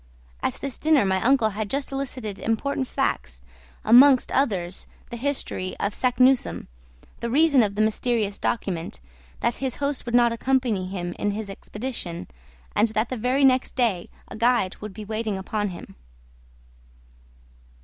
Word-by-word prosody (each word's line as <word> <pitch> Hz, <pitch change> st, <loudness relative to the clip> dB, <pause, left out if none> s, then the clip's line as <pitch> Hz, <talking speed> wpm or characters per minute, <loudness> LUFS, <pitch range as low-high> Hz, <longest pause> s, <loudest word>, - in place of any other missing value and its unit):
At -, -, -1 dB
this 275 Hz, -2 st, -6 dB
dinner 305 Hz, -6 st, +4 dB
my 190 Hz, -1 st, +1 dB
uncle 240 Hz, -4 st, +3 dB
had 210 Hz, 0 st, -4 dB
just 275 Hz, +3 st, -2 dB
elicited 255 Hz, -7 st, -4 dB
important 260 Hz, +4 st, -1 dB
facts, -, -, -2 dB, 0.4 s
amongst 255 Hz, +2 st, +7 dB
others, 190 Hz, -10 st, -1 dB, 0.2 s
the -, -, -4 dB
history 235 Hz, -8 st, -3 dB
of 200 Hz, -, -1 dB
Saknussemm, 255 Hz, +1 st, +2 dB, 0.5 s
the 235 Hz, -, -3 dB
reason 285 Hz, +1 st, +5 dB
of 205 Hz, -3 st, 0 dB
the 215 Hz, -, +2 dB
mysterious 215 Hz, -2 st, 0 dB
document, 175 Hz, -, -2 dB, 0.4 s
that 235 Hz, -, 0 dB
his 265 Hz, -2 st, -2 dB
host 280 Hz, -3 st, -3 dB
would 235 Hz, -, 0 dB
not 240 Hz, -1 st, +5 dB
accompany 235 Hz, -6 st, 0 dB
him 175 Hz, -2 st, -4 dB
in 205 Hz, -, 0 dB
his 205 Hz, 0 st, -4 dB
expedition, 210 Hz, -4 st, -6 dB, 0.5 s
and 220 Hz, -, +4 dB
that 220 Hz, +1 st, -1 dB
the 255 Hz, -, -2 dB
very 255 Hz, +4 st, +2 dB
next 260 Hz, -1 st, +2 dB
day 225 Hz, -9 st, 0 dB, 0.2 s
a -, -, -9 dB
guide 230 Hz, -4 st, +2 dB
would 210 Hz, -2 st, -8 dB
be 215 Hz, 0 st, -7 dB
waiting 215 Hz, -1 st, -2 dB
upon 205 Hz, +2 st, -2 dB
him. 180 Hz, -3 st, -9 dB
230 Hz, 150 wpm, -24 LUFS, 200-260 Hz, 0.5 s, amongst